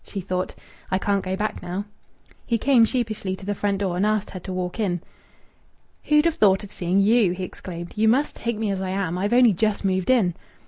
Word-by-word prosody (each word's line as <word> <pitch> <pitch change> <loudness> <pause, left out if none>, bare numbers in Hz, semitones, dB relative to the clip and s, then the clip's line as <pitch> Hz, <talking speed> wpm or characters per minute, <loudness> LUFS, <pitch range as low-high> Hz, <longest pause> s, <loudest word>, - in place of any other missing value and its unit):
She 200 - -6
thought, 185 0 -3 0.3
"I 185 - +1
can't 200 0 0
go 185 0 -2
back 210 +2 -3
now." 185 +3 -4 0.6
He 235 - +2
came 245 -1 +5
sheepishly 215 -6 -2
to 190 - -12
the 205 - -1
front 200 0 -1
door 190 -3 -1
and 180 - 0
asked 215 -1 0
her 185 - -6
to 185 - -7
walk 185 +2 -3
in. 180 -5 0 1.1
"Who'd 300 +1 +4
have 335 - +3
thought 200 -7 +3
of 205 - -10
seeing 180 +2 +1
you?" 210 -3 +4
he 185 +1 -5
exclaimed. 175 -1 -7
"You 220 +1 +2
must 265 +7 +2
take 235 -2 -2
me 215 -2 -1
as 190 -1 -2
I 190 - -3
am. 185 -3 -1
I've 200 +4 -1
only 240 -3 +6
just 210 +2 0
moved 190 +1 0
in." 220 -9 +3
200 Hz, 225 wpm, -23 LUFS, 185-220 Hz, 1.1 s, only